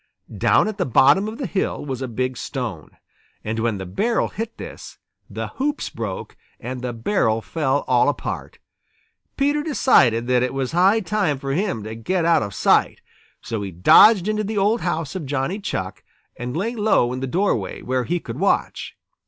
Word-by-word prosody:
Down - - +3
at 215 -1 -5
the 180 - +1
bottom 140 - +4
of 220 +1 -6
the 270 - -4
hill 190 -8 -2
was 135 -2 -4
a 130 - -2
big 130 +2 -2
stone, 115 - -6 0.5
and 110 +1 -3
when 115 -2 0
the 95 - -6
barrel 220 - 0
hit 225 +1 -6
this, - - -9 0.3
the - - -5
hoops 290 +2 -2
broke, 110 -5 -6 0.2
and 125 +1 -6
the 125 -1 -3
barrel 115 - 0
fell 140 +2 -1
all 125 +2 +4
apart. 145 - -5 0.8
Peter 290 +2 +1
decided 130 - +3
that 125 0 +2
it 125 +1 -1
was 135 -2 -2
high 190 +6 +4
time 195 -7 0
for 135 0 -4
him 170 - -1
to 110 +1 -6
get 165 +10 -1
out 170 -1 +4
of 100 -3 -5
sight. - - +2 0.4
So 110 -2 -4
he 100 - -4
dodged 180 - +6
into 215 0 0
the 215 +1 -3
old 210 +4 +2
house 165 -5 -2
of 175 -7 -5
Johnny 145 +8 -2
Chuck 95 - -4 0.3
and 125 +3 -5
lay 225 +7 -1
low 205 - +2
in 130 - -4
the 135 - -3
doorway, 130 - -1
where 130 -1 -1
he 175 +2 -1
could 125 -3 -8
watch. 195 - -1
140 Hz, 185 wpm, -22 LUFS, -, 0.8 s, dodged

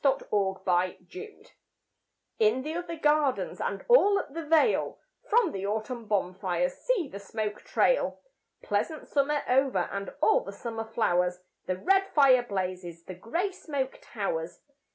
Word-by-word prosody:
VI 275 -1 +4
Autumn 190 -2 0
Fires 190 - -3 0.9
In 430 - +3
the 310 +2 -4
other 340 -1 -4
gardens 295 -3 +1
And - - -3
all 410 -5 +6
up 280 - -4
the 330 +1 -4
vale, 325 +8 +2 0.3
From 450 -6 +4
the 195 -3 -4
autumn 220 +2 -3
bonfires 185 -3 0
See 470 - -1
the 200 - -8
smoke 210 +1 -4
trail! - - +1 0.4
Pleasant 320 -10 -2
summer 290 +1 +1
over 255 -8 +2
And 200 0 -4
all - - +4
the 200 - -8
summer 225 +1 -5
flowers, 180 -5 0 0.3
The 185 - -1
red 390 - +3
fire 270 -4 +6
blazes, 185 -6 -4
The 185 - -8
grey 335 - -2
smoke 280 -7 -4
towers. 170 -6 -4
245 Hz, 145 wpm, -28 LUFS, -, 0.9 s, all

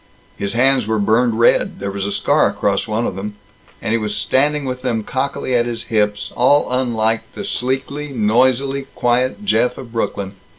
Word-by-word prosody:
His 100 - -3
hands 130 -1 +3
were 110 0 +1
burned 110 +3 +2
red; 115 - +3
there 100 0 -3
was 100 0 -3
a - - -3
scar - - +2
across 100 +1 -1
one 110 +2 -1
of - - -3
them; 105 +2 -5 0.5
and - - -1
he 115 - +2
was 105 -1 -2
standing 140 +7 +1
with 125 -1 -4
them 120 -4 -1
cockily 130 +2 -2
at 120 -1 +2
his 115 -1 -4
hips, 105 -1 0
all 135 +3 +3
unlike 115 -3 +1
the 205 - -5
sleekly, 140 -3 -2
noisily 130 +4 +1
quiet 125 +10 0
Jeff 125 -10 +2
of 120 - -9
Brooklyn. 100 -4 -3
120 Hz, 180 wpm, -19 LUFS, 105-130 Hz, 0.5 s, hands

